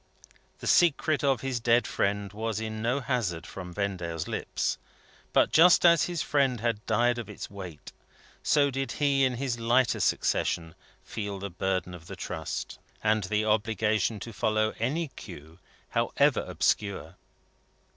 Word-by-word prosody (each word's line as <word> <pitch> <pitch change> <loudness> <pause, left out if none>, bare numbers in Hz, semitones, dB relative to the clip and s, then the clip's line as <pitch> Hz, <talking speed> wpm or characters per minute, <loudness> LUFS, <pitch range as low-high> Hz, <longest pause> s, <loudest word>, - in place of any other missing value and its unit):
The - - -7
secret 155 -3 +3
of 135 -3 +2
his 130 -2 -2
dead 120 +1 +3
friend 100 0 -1
was 110 0 -2
in 110 -1 -4
no 125 +5 0
hazard 120 - -2
from 90 -2 -8
Vendale's 85 -4 -3
lips; - - -2 0.5
but - - +3
just 175 +2 +6
as 170 -3 +6
his 175 -3 -2
friend 135 -4 +1
had 115 -1 -1
died 120 +2 +2
of 115 - -7
its - - -8
weight, 90 -6 -9 0.5
so 140 -1 +3
did 135 +1 -3
he 140 -2 +2
in 130 -1 +2
his 120 -2 -2
lighter 120 +2 +2
succession 80 -1 0 0.3
feel 100 -2 -5
the 100 0 -6
burden 95 0 -2
of 85 -1 -11
the - - -7
trust, - - -5 0.2
and 110 -2 +2
the 105 +2 0
obligation 110 0 +1
to 115 - -7
follow 110 +1 +1
any 145 +8 -1
clue, 80 - -12 0.3
however - - +2
obscure. 100 -5 -1
110 Hz, 150 wpm, -28 LUFS, 100-130 Hz, 0.5 s, just